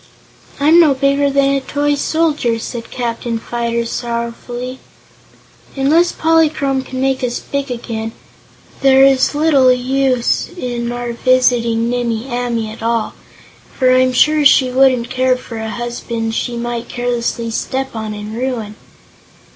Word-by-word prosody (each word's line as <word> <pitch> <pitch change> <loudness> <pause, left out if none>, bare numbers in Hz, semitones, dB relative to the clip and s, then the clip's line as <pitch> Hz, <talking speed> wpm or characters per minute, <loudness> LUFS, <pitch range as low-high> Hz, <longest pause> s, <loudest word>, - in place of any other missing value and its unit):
"I'm 310 +4 +5
no 305 -5 +5
bigger 280 +1 +2
than 275 0 +2
a 275 - 0
toy 290 +2 -1
soldier!" 290 -5 0
said 230 +1 -6
Captain 235 -1 -3
Fyter, 235 0 -2
sorrowfully. 240 +2 -5 1.0
"Unless 310 +6 +2
Polychrome 310 -4 +1
can 260 0 -7
make 265 0 0
us 245 -1 -1
big 280 -1 -4
again, 230 -2 -4 0.7
there 270 0 +6
is 270 +1 +3
little 290 -4 +4
use 255 0 0
in 240 -5 -3
our 240 0 -4
visiting 235 -2 +2
Nimmie 240 -1 -2
Amee 240 -3 -2
at 220 - -11
all, 230 -1 -1 0.6
for 255 -1 +4
I'm 255 0 +3
sure 300 +4 +3
she 265 -2 +5
wouldn't 255 -2 +3
care 255 0 +2
for 235 -2 -9
a 220 0 -4
husband 235 0 -4
she 240 +1 -2
might 240 0 -4
carelessly 240 -1 -2
step 265 +3 -3
on 220 -1 -4
and 210 +1 -7
ruin." 230 -4 -4
250 Hz, 140 wpm, -16 LUFS, 235-270 Hz, 1.0 s, there